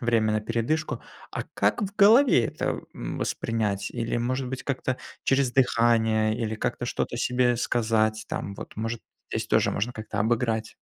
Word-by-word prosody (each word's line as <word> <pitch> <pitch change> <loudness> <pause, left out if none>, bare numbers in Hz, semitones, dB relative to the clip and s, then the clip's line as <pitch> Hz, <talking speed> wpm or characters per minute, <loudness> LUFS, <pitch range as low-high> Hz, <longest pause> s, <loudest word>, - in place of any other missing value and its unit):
время 115 -3 +2
на 110 - +1
передышку. 115 +5 -1 0.3
А - - -3
как 100 - +1
в 200 0 -3
голове 215 - +6
это, - - -2
м, - - -5
воспринять? 105 -3 -1
Или, 115 -1 -2
может 125 +2 -1
быть, 130 0 -5
как-то 130 -1 -2 0.3
через 135 -2 +2
дыхание 115 -4 +3
или 110 -2 -2
как-то 110 - -2
что-то - - -2
себе 125 -1 +2
сказать? 110 -2 +1
Там 100 - -4
вот, - - -9
может, 115 +2 -3 0.3
здесь - - -2
тоже - - +3
можно 115 +5 -1
как-то 110 -2 -5
обыграть? 110 0 0
115 Hz, 160 wpm, -26 LUFS, 110-125 Hz, 0.3 s, голове